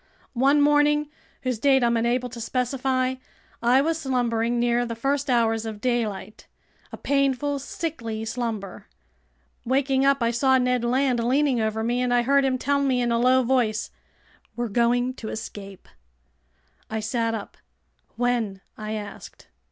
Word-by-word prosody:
One 275 +4 +3
morning—whose 295 -4 0
date 265 0 +4
I'm 235 0 +2
unable 240 +2 0
to 235 -1 -8
specify—I 255 0 -1
was 320 +2 0
slumbering 240 -4 0
near 240 0 +2
the 230 -1 -4
first 275 +4 -1
hours 225 -2 +2
of 220 -2 -6
daylight, 220 -4 -3 0.4
a - - -7
painful, 275 0 0
sickly 235 -7 -5
slumber. 225 -4 -4 0.8
Waking 265 +1 +1
up, 275 -2 +3
I 230 - +2
saw 265 +2 +3
Ned 250 -1 +1
Land 250 0 +1
leaning 260 0 +2
over 220 0 -1
me, 240 +2 0
and 250 -1 0
I 245 0 +3
heard 280 +2 +3
him 260 -1 +1
tell 280 +2 0
me 265 -3 +1
in 240 -1 0
a 230 - +2
low 255 +1 +4
voice: 235 -4 0 0.6
"We're 240 -1 -2
going 245 +3 +1
to 220 - -6
escape!" 200 -3 -8 1.0
I 220 - -2
sat 230 +1 -1
up. 210 - -7 0.6
"When?" 235 -5 -1
I 215 0 -5
asked. 210 -2 -8
245 Hz, 145 wpm, -24 LUFS, 230-265 Hz, 1.0 s, date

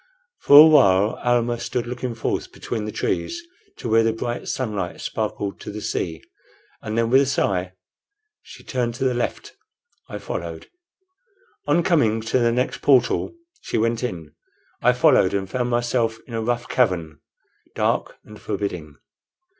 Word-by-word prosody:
For 145 +1 +8
a 155 - +11
while 100 -10 +4
Almah 120 -1 +1
stood 120 0 -3
looking 125 0 -5
forth 115 - -3
between 110 -3 -5
the 105 - -4
trees 340 - -2 0.4
to - - -6
where 115 0 +4
the 115 0 +2
bright 120 +2 -4
sunlight 105 -8 -3
sparkled 105 -2 -4
on - - -5
the 105 - -5
sea, 90 -6 -3 0.6
and 110 +1 -4
then 115 0 +1
with 135 +1 +6
a 140 - +1
sigh 95 -8 -1 0.7
she - - -14
turned 120 -3 -2
to 130 - -4
the 130 -1 +2
left. 120 - -3 0.6
I - - -5
followed. - - -6 1.0
On 160 +4 +3
coming 115 - +2
to 115 +3 0
the 120 -1 +2
next 125 +3 -1
portal 130 - +2 0.3
she - - -3
went 115 +1 0
in. 85 -10 -5 0.5
I 125 - +4
followed, 125 - +4
and 95 -1 -2
found 125 +4 -2
myself 120 -1 0
in 120 - -12
a 115 - -2
rough 120 +1 -2
cavern, 85 - 0 0.6
dark - - -1
and - - -14
forbidding. 85 -7 -4
115 Hz, 160 wpm, -22 LUFS, 105-125 Hz, 1.0 s, a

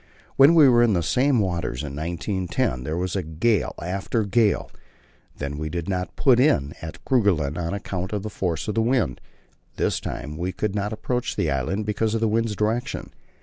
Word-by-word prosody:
When 140 +5 +7
we 155 -4 +8
were 120 -2 +5
in 120 -3 +4
the 85 -2 +1
same 130 - +2
waters 85 - -1
in 70 -2 -6
1910, 85 - -2
there 80 +2 -2
was 90 +1 -2 0.2
gale 115 -3 +2
after 100 +5 -1
gale; 105 0 +1 0.7
then 70 0 -4
we 80 0 -3
did 85 0 -4
not 90 -2 -3
put 125 -3 +4
in 75 - +3
at 80 0 -9
Kerguelen 90 - +2
on 85 +2 -2
account 95 -2 -4
of 105 -2 -2
the 110 - -5
force 85 -5 -2
of 105 - -1
the 115 - +1
wind; 115 - +1 0.5
this - - 0
time 75 +1 -6
we 90 +3 -2
could 105 -2 -2
not 105 0 -2
approach 125 +3 -2
the - - 0
island 70 +11 -1
because 110 +1 0
of - - +1
the 115 - +3
wind's 110 0 0
direction. 115 +6 -2
100 Hz, 190 wpm, -24 LUFS, 85-115 Hz, 0.7 s, we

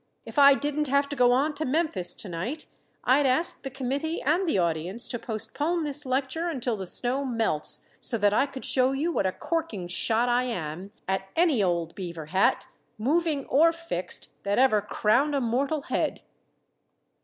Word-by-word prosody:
If - - -3
I 280 -1 +8
didn't 295 +1 -2
have 280 +1 +2
to 290 - -4
go 250 -2 +4
on 280 +5 +2
to 310 - -3
Memphis 285 - 0
to - - -7
night, 190 - -5 0.4
I'd 270 +3 +3
ask 285 +7 0
the 270 - -5
committee 275 +5 -3
and 335 +6 +1
the - - +1
audience 175 +5 0
to 240 - -3
postpone 290 - -2
this 295 -1 +3
lecture 270 +6 -1
until 255 -8 -2
the 190 -3 -6
snow 255 +8 +2
melts, 225 - 0
so 235 - +1
that 205 -1 +2
I 275 - +2
could 270 -1 -7
show 260 0 +2
you 305 +6 -1
what 200 - 0
a - - 0
corking 230 - -3
shot 225 +6 +1
I 245 +1 +2
am 180 -4 -5 0.2
at 190 0 -2
any 325 -9 +3
old 170 -3 0
beaver 170 -4 -7
hat, 190 - +2 0.3
moving 295 +4 0
or 320 +5 +4
fixed, 330 - -5
that 200 0 -1
ever 250 -5 +4
crowned 240 +8 +1
a - - +2
mortal 270 +5 -1
head." - - -2
255 Hz, 180 wpm, -26 LUFS, 205-290 Hz, 0.4 s, I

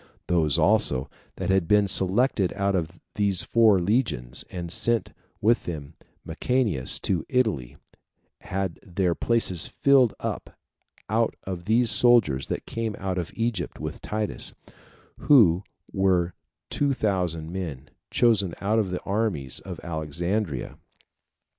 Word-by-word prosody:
Those 80 -5 +2
also 65 +1 +2 0.2
that - - -2
had 95 -3 +2
been 105 +1 +4
selected 95 +1 +3
out 100 0 0
of 85 -1 -3
these 100 -3 +1
four 115 -4 +4
legions, 85 - -1
and 85 -2 -6
sent 115 +4 0 0.3
with 115 +3 +2 0.6
Mucianus 110 - 0
to 90 -4 0
Italy, 110 - 0 0.6
had 95 -2 -4
their 90 -1 -1
places 100 -5 -1
filled 135 -5 +3
up - - -5 0.5
out 115 +2 +1
of 90 -2 -6
these 115 +2 +3
soldiers 105 - +4
that - - -4
came 115 -2 -3
out 95 -1 -2
of 85 - -4
Egypt 115 -6 -2
with - - -6
Titus; 105 0 -3 0.6
who 100 - +5 0.3
were 95 -3 +1 0.4
two 145 -1 +1
thousand 90 -8 -1
men, 85 -8 -6 0.2
chosen 105 -7 +2
out 110 +3 +1
of 100 -4 0
the 90 - -4
armies 100 - -2
at - - -8
Alexandria. 85 - -3
95 Hz, 125 wpm, -25 LUFS, 85-110 Hz, 0.6 s, who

